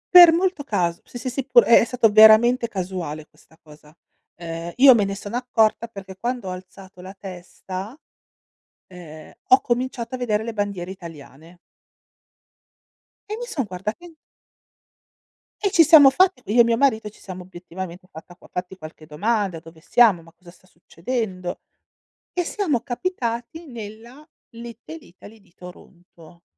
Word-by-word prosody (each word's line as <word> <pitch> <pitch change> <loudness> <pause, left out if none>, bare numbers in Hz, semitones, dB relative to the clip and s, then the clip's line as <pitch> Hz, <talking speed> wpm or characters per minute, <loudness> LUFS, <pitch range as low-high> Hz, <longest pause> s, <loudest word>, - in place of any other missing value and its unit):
Per 350 -2 +11
molto 355 -2 -1
cas 180 -9 -2
sì, - - -11
sì, 255 +1 -5
sì 270 +2 -3
pure 245 -2 +5
è 235 - +6
stato 235 -2 +2
veramente 220 +3 +6
casuale 180 -7 -6
questa 160 - -26
cosa. 150 -2 -18 0.4
Ehm, 165 0 -7
io 265 +1 +8
me 215 -4 +1
ne 195 0 -4
sono 205 +3 -6
accorta 230 -2 0
perché 195 -4 -11
quando 240 -4 -4
ho - - -4
alzato 185 0 -12
la 190 +2 -11
testa, 190 - -9 0.9
ehm, 165 -4 -13 0.2
ho 255 - +6
cominciato 245 0 -3
a - - -4
vedere 220 -3 -1
le 230 - -5
bandiere 200 -4 -4
italiane. 165 -2 -13 1.7
E 430 - -4
mi 485 - -6
son 275 - -3
guardata 205 - -6
in 345 - -14 1.5
E 400 - 0
ci 345 -4 +6
siamo 310 -4 +8
fatti 365 +1 +2
io 240 +2 +5
e - - +7
mio 230 0 +1
marito 225 -5 +1
ci 210 - -22
siamo 185 -1 -9
obiettivamente 180 0 -10
fatta 170 +2 -13
qua - - -20
fatti 180 +1 -6
qualche 155 -2 -12
domanda: 195 +3 -2
"Dove 160 -1 -16
siamo? 225 -3 +3
Ma 165 0 -18
cosa 175 0 -17
sta 185 - -25
succedendo?" 185 +1 -5 0.7
E 355 - -1
siamo 330 - -2
capitati 245 +1 -4
nella 235 +4 -11 0.2
Little 235 +5 -11
Italy 210 0 -16
di 190 -3 -28
Toronto, 175 -1 -16
210 Hz, 155 wpm, -22 LUFS, 180-245 Hz, 1.7 s, Per